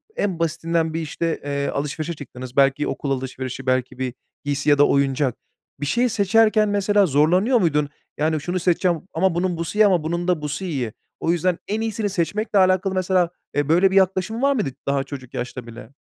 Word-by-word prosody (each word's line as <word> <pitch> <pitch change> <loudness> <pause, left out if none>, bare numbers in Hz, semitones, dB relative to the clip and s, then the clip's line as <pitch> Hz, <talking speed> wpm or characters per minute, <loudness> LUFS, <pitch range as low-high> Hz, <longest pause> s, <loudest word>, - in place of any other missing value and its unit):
en 185 -5 -1
basitinden 165 0 0
bir 165 - -2
işte, 165 +2 -2
eee, 140 0 -2
alışverişe 150 +3 -3
çıktınız, 130 -3 -9
belki 140 +1 +3
okul 140 - -3
alışverişi, 130 0 -4
belki 130 0 0
bir 130 -2 -2 0.3
giysi 145 +1 0
ya 145 - +5
da 145 - +6
oyuncak. 135 -2 +1 0.4
Bir 145 - -3
şeyi 240 - +2
seçerken 215 +1 +3
mesela 205 0 +3
zorlanıyor 180 - +3
muydun? 150 -5 +1 0.3
Yani, 155 0 0
şunu 180 +3 -2
seçeceğim 175 -1 +1
ama 175 +1 +1
bunun 175 -1 0
busu 170 +5 -4
iyi 215 - +7
ama 180 -6 +3
bunun 170 +2 -2
da 175 -4 +1
busu 150 +5 -4
iyi. 130 - -3 0.3
O 165 - +1
yüzden 175 +1 +1
en 215 +2 -1
iyisini 220 -2 -1
seçmekle 200 +3 0
alakalı 185 +1 +3
mesela, 185 -2 +2 0.3
e, 145 0 0
böyle 185 +4 +4
bir - - -1
yaklaşım 190 +4 +2
var 280 0 +3
mıydı 215 - -1 0.2
daha 140 -1 +1
çocuk 135 -3 -9
yaşta 125 0 -5
bile? 115 +1 -11
165 Hz, 190 wpm, -22 LUFS, 140-190 Hz, 0.4 s, iyi